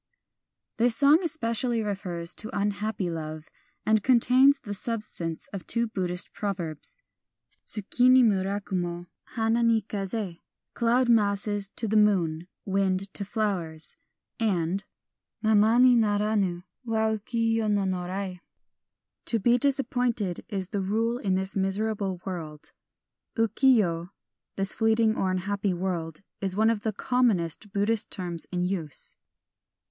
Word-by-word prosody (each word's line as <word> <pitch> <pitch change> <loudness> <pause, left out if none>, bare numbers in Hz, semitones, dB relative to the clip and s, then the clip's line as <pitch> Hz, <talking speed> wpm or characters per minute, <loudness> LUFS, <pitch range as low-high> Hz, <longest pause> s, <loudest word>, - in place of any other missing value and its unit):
This 235 0 +4
song 285 +4 +6
especially 240 - 0
refers 180 -4 -3
to 215 - -5
unhappy 205 -1 -1
love, 155 -1 -6 0.4
and 215 0 +3
contains 255 +4 +5
the 205 -3 -6
substance 205 -7 -3
of 195 - -7
two 235 0 +1
Buddhist 180 -4 -3
proverbs: 185 - -5 0.6
Tsuki 235 +4 +2
ni 255 0 +7
mura 200 -2 +1
kumo, 175 -3 -3 0.3
hana 225 0 +1
ni 230 -1 +3
kaze 195 -3 -4 0.3
(cloud 240 +2 +2
masses 205 -2 +2
to 225 - -2
the 215 +1 +2
moon; 175 -6 +2 0.2
wind 195 0 0
to 200 - -2
flowers); 190 -7 -2 0.4
and 190 -3 0 0.6
Mama 220 +1 +4
ni 250 0 +6
naranu 205 -5 +1 0.2
wa 220 -2 0
uki 225 +1 -1
yo 225 -1 0
no 205 -1 +1
narai 185 0 -3 0.9
(to 230 - +1
be 240 +4 +3
disappointed 245 -8 0
is 195 -3 -2
the 200 - -2
rule 225 +5 0
in 190 -5 0
this 190 +1 +1
miserable 195 -1 -1
world). 160 -6 -6 0.3
" - - -59
Uki 225 +4 +4
yo 170 -5 0 0.2
" - - -62
(this 195 0 +3
fleeting 220 0 +2
or 190 - 0
unhappy 195 +1 -1
world) 170 -3 -3 0.2
is 190 -2 -2
one 220 +1 +4
of 220 -3 -2
the 220 - -1
commonest 210 -5 0
Buddhist 205 +2 0
terms 175 -4 -5
in 180 -1 -1
use. 175 -6 -1
205 Hz, 135 wpm, -27 LUFS, 185-225 Hz, 0.9 s, ni